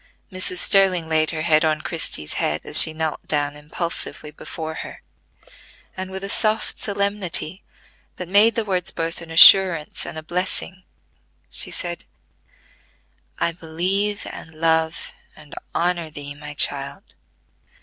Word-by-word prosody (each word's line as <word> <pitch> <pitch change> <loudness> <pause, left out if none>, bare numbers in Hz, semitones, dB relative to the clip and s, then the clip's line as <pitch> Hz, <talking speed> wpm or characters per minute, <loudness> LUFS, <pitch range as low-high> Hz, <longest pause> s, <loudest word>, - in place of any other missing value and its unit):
Mrs. 185 -1 0
Sterling 185 -3 +3
laid 155 -1 +1
her 155 -1 -4
hand 155 -2 +3
on 155 -1 0
Christie's 155 - -3
head, 75 +1 -1
as 150 - +10
she 160 - +5
knelt 155 -1 -4
down 145 -1 -1
impulsively 150 0 -5
before 160 +1 -7
her, - - -11 0.9
and 185 0 -6
with 190 0 -6
a - - -3
soft 215 +1 0
solemnity 200 -3 -1 0.5
that 180 - -7
made 205 +4 +4
the 230 - -2
words 185 -3 -1
both 165 0 -5
an 165 - -11
assurance 170 -1 +6
and - - -7
a 155 - -7
blessing, 185 +2 -4 0.7
she - - -1
said: 175 -1 -4 1.3
"I 170 - 0
believe 185 +5 -2
and 160 - -11
love 160 0 -1 0.2
and 150 -2 -16 0.2
honor 170 -2 -1
thee, 145 -1 -8
my 145 0 -10
child. 140 0 -1
165 Hz, 140 wpm, -21 LUFS, 155-185 Hz, 1.3 s, as